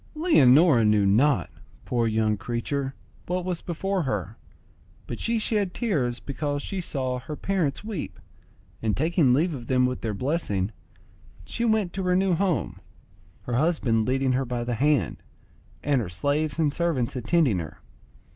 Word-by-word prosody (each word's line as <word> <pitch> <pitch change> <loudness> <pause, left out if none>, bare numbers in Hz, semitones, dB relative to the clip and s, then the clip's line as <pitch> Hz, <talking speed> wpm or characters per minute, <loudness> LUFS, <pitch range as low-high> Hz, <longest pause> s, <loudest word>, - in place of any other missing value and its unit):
Leonora 155 - +5
knew 105 -1 +3
not, 105 - +3 0.3
poor 120 -2 0
young 110 -1 +1
creature, 135 +6 -3 0.3
what 180 0 -2
was 180 -2 -2
before 190 +3 -2
her, 105 - -3 0.7
but 120 - -6
she 230 0 0
shed 210 -4 -1
tears 140 - 0
because 145 0 -3
she 195 -2 -3
saw 130 -6 -2
her 150 +4 -7
parents 175 -4 -1
weep, 210 -7 -5 0.6
and 110 -2 0
taking 160 -1 +3
leave 160 +7 +2
of 120 -4 -7
them 125 -1 +3
with 125 0 -2
their 110 -3 -2
blessing, 110 - -1 0.7
she 230 - -4
went 220 -6 +1
to 195 - -3
her 180 -1 +1
new 190 0 +2
home, 175 - -1 0.6
her 120 - -4
husband 125 -8 +1
leading 130 0 +1
her 130 +1 +1
by 120 -1 -3
the 120 0 -2
hand, 135 - +1 0.7
and 140 -3 +2
her 95 - -4
slaves 145 - -1
and 155 -3 +1
servants 160 -9 -1
attending 130 - +2
her. 80 - -7
140 Hz, 155 wpm, -25 LUFS, 120-175 Hz, 0.7 s, Leonora